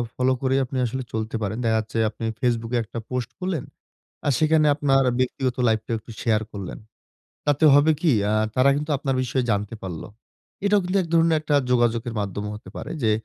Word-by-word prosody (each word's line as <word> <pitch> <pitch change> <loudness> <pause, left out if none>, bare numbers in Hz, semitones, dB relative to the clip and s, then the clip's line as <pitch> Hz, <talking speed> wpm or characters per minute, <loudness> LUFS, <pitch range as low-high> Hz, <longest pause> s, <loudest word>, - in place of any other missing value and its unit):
Follow 130 +1 +2
করেই 135 0 +2
আপনি 130 - -5
আসলে 130 +2 -3
চলতে 110 0 -3
পারেন। 105 +1 -2
দেখা 110 -1 +2
যাচ্ছে 110 +1 -5
আপনি 110 - -10 0.2
Facebook 115 -3 0
এ - - +3
একটা 115 +2 -7
পোস্ট 125 -2 -2
করলেন। 180 -6 -2 0.6
আর 145 - +3
সেখানে 155 0 +4
আপনার 135 -2 +3 0.2
ব্যক্তিগত 130 0 -1
লাইফটাও 110 +1 0
একটু 110 - -14
শেয়ার 110 -2 +2
করলেন। 100 -3 -6 0.7
তাতে 145 +1 +2
হবে 145 +2 +5
কী? 160 -4 +3 0.2
আ - - +1 0.2
তারা 130 +2 +5
কিন্তু 150 +2 -3
আপনার 135 -1 -1
বিষয়ে 130 0 -1
জানতে 105 +1 -1
পারলো। 90 -4 -6 0.6
এটাও 205 0 +4
কিন্তু 180 +2 -1
১ 170 - -7
ধরনের 165 -1 +4
একটা 150 -1 -1 0.2
যোগাযোগের 120 -1 +1
মাধ্যমও 100 +1 -4
হতে 105 -3 -11
পারে। - - -6
যে, 110 - +3
125 Hz, 190 wpm, -24 LUFS, 110-145 Hz, 0.7 s, হবে